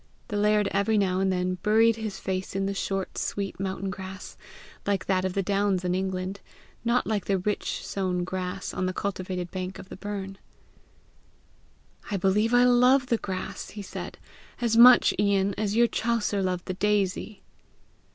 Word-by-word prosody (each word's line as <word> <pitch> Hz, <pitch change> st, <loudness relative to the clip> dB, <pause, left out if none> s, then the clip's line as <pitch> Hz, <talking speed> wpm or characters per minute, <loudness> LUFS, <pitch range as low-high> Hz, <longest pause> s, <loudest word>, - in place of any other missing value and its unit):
The 210 Hz, -, -3 dB
laird 210 Hz, 0 st, +3 dB
every 205 Hz, +2 st, +2 dB
now 185 Hz, -2 st, +1 dB
and 190 Hz, 0 st, +2 dB
then 185 Hz, 0 st, -1 dB
buried 225 Hz, +1 st, +4 dB
his 215 Hz, -3 st, -5 dB
face 185 Hz, 0 st, -3 dB
in 195 Hz, 0 st, 0 dB
the 200 Hz, -, -1 dB
short 195 Hz, -1 st, -3 dB
sweet 200 Hz, -2 st, -3 dB
mountain 190 Hz, 0 st, -3 dB
grass 190 Hz, 0 st, -8 dB, 0.5 s
like 200 Hz, -1 st, 0 dB
that 185 Hz, -1 st, +1 dB
of 185 Hz, -, -1 dB
the 195 Hz, -, +1 dB
clowns 195 Hz, -1 st, +1 dB
in 180 Hz, -, +1 dB
England, 190 Hz, +1 st, -2 dB, 0.4 s
not 235 Hz, +1 st, +2 dB
like 210 Hz, -3 st, -1 dB
the 195 Hz, -, +1 dB
rich 205 Hz, +3 st, -2 dB
sown 185 Hz, -2 st, -1 dB
grass 185 Hz, +1 st, -4 dB
on 185 Hz, -, -1 dB
the 185 Hz, -, -2 dB
cultivated 185 Hz, -2 st, -3 dB
bank 185 Hz, 0 st, -5 dB
of 190 Hz, -, -11 dB
the -, -, -8 dB
burn. 195 Hz, -1 st, -6 dB, 1.7 s
"I 200 Hz, -, -1 dB
believe 200 Hz, +5 st, +2 dB
I 245 Hz, 0 st, +5 dB
love 250 Hz, +2 st, +5 dB
the 235 Hz, -2 st, +1 dB
grass," 185 Hz, -1 st, -5 dB
he 205 Hz, 0 st, -8 dB
said, -, -, -7 dB, 0.4 s
"as 235 Hz, -2 st, +1 dB
much, 240 Hz, +2 st, +8 dB
Ian, 200 Hz, -1 st, +2 dB
as 210 Hz, -1 st, -1 dB
your 235 Hz, +1 st, +5 dB
Chaucer 225 Hz, -3 st, 0 dB
loved 180 Hz, -1 st, -2 dB
the 185 Hz, -, -3 dB
daisy!" 205 Hz, +1 st, -1 dB
195 Hz, 170 wpm, -27 LUFS, 185-210 Hz, 1.7 s, much